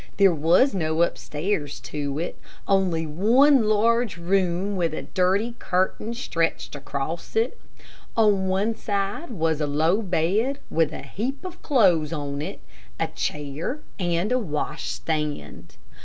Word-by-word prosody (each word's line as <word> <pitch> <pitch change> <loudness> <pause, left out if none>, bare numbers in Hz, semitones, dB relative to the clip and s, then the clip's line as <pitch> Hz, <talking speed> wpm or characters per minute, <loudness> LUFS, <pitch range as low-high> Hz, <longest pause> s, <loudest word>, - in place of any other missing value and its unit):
There 195 -3 +6
was 170 - +4
no 160 -2 +1
upstairs 150 -3 -2
to 145 -1 -4
it 170 +3 -3 0.3
only 185 -5 +2
one 230 - +4
large 225 0 +2
room 185 +2 0
with 170 -4 0
a - - -4
dirty 195 +6 +1
curtain 190 +5 -1
stretched 165 -9 -1
across 145 +3 -5
it. 225 +3 0 0.6
On 205 -4 +4
one 195 +4 +1
side 205 +8 -2
was 165 -8 0
a 150 - +1
low 160 +8 +2
bed 200 - +1
with 160 -2 +2
a - - -7
heap 245 - -4
of 360 -1 -8
clothes 180 - +3
on 145 -3 -3
it, 155 - -6 0.4
a - - 0
chair 150 - -3 0.2
and 175 +3 0
a 255 - +3
wash 150 -6 -3
stand. 150 - -4
180 Hz, 140 wpm, -24 LUFS, 155-215 Hz, 0.6 s, There